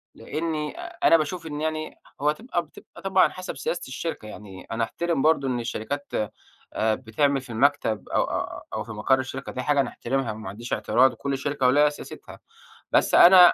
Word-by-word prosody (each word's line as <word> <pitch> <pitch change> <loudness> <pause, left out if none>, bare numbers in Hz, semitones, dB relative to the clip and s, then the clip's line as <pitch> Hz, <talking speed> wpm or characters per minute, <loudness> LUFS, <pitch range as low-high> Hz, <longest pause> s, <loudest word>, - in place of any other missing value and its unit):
لأني 155 -2 -3
أنا 165 - +3
باشوف 165 +2 -3
إن 150 -1 -5
يعني 155 0 -3 0.2
هو 150 - +4
تبقى 175 +1 -3
بتبقى 150 - -15
طبعًا 190 -1 +4
حسب 185 0 -7
سياسة 170 - -2
الشركة 130 -3 -5
يعني، 100 -3 -10
أنا 115 +1 0
أحترم 170 +5 -1
برضه 155 -3 +3
إن 125 -2 0
الشركات 125 +4 -4 0.7
بتعمل 125 +5 +1
في 125 - -15
المكتب 120 -3 +1
أ - - -4
أ - - -1
أو - - -2
في - - -9
مقر 110 +5 +2
الشركة، 130 0 -5
دي 130 - -4
حاجة 145 +2 +3
نحترمها 135 -1 -2
وما 110 -2 -7
عنديش 115 +5 -6
اعتراض، 130 +1 +4
وكل 140 +3 -3
شركة 140 -1 0
وليها 145 +3 +5
سياستها، 145 - -10 0.5
بس - - +4
أنا 180 -1 +9
140 Hz, 175 wpm, -25 LUFS, 120-155 Hz, 0.7 s, أنا